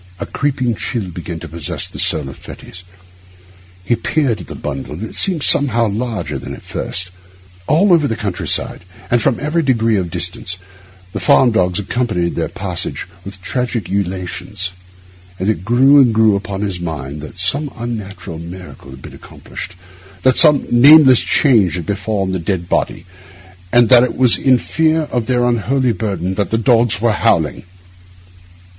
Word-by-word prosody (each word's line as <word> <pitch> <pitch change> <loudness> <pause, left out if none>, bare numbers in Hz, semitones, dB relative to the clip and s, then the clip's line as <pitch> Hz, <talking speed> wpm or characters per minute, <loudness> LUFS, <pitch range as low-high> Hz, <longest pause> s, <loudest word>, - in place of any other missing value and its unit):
A - - -4
creeping 130 -4 -1
chill 110 -2 -4
began 85 0 -7
to 85 - -7
possess 80 -1 -4
the - - -6
soul 75 -4 +1
of 65 - -9
Fettes. 90 - -11 1.0
He 120 +6 +1
peered 125 -7 -1
at 85 - -11
the - - -8
bundle, 70 0 -6
and 90 - -7
it 110 - -7
seemed 180 -7 0
somehow 120 -5 +3
larger 105 - -4
than - - -7
at - - -15
first. 95 0 -3 0.6
All 175 +6 +4
over 155 -4 +3
the 115 - -2
country 105 -5 -4
side, - - 0 0.3
and 120 -1 +3
from 115 - +1
every 150 +3 0
degree 115 -6 +1
of 90 -3 -2
distance, 90 +1 -4 0.6
the 100 - -3
farm 120 +7 +4
dogs 90 -5 +1
accompanied 105 -4 -1
their - - -2
passage - - -4 0.2
with 95 -1 -11
tragic 120 -3 -3
ululations; 95 0 -3 0.7
and 95 +3 -1
it 90 -5 -5
grew 135 +6 +5
and 120 -4 +2
grew 110 -2 +4
upon 100 0 -4
his 100 -4 -3
mind 75 -4 -6
that 75 +3 -10
some 140 +11 0
unnatural 105 -7 -6
miracle 90 -3 -10
had 65 0 -12
been - - -10
accomplished, - - -10 0.5
that 130 -1 +4
some 150 -3 +6
nameless 135 +1 +7
change 110 - +2
had 85 -3 -5
befallen 100 0 -2
the 95 - -2
dead 85 0 -3
body, - - -2 0.7
and 120 -1 +5
that 125 -2 +8
it 125 - -2
was 125 -3 +5
in 130 -2 +3
fear 160 +5 0
of 120 -3 -2
their 125 -1 +1
unholy 125 +2 +1
burden 95 -3 -3
that 95 -1 -2
the 110 - 0
dogs 115 -3 +2
were 115 +1 +2
howling. 85 - +1
105 Hz, 170 wpm, -16 LUFS, 90-125 Hz, 1.0 s, that